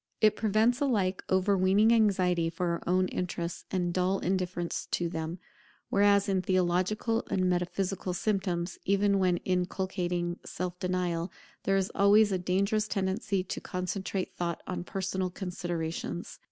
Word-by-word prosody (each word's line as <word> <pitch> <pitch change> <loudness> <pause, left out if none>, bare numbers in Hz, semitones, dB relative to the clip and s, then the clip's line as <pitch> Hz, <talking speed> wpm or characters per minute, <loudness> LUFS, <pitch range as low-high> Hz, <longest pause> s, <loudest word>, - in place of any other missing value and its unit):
It 215 -1 +5
prevents 225 +4 +2
alike 200 -9 +1
overweening 195 +3 +4
anxiety 185 -6 +3
for 170 +2 -2
our 170 - -1
own 185 +1 +3
interests 175 -1 -4
and 175 -2 -1
dull 185 +2 +1
indifference 180 -2 -2
to 175 - 0
them; 160 +1 -4 0.5
whereas, 200 0 +4
in 190 -2 +1
theological 185 +5 +1
and 185 -1 +1
metaphysical 180 +1 -1
systems, 185 -4 -1
even 200 0 +2
when 180 -2 +3
inculcating 180 -1 -1
self 180 0 -5
denial, 180 -1 -1 0.3
there 195 0 +3
is 190 0 0
always 205 +1 +5
a 185 - 0
dangerous 200 +4 +1
tendency 195 -1 -1
to 180 - -5
concentrate 185 +1 -3
thought 170 -1 -3
on 175 -1 -4
personal 190 -1 -2
considerations. 175 -2 -4
185 Hz, 135 wpm, -29 LUFS, 180-200 Hz, 0.5 s, It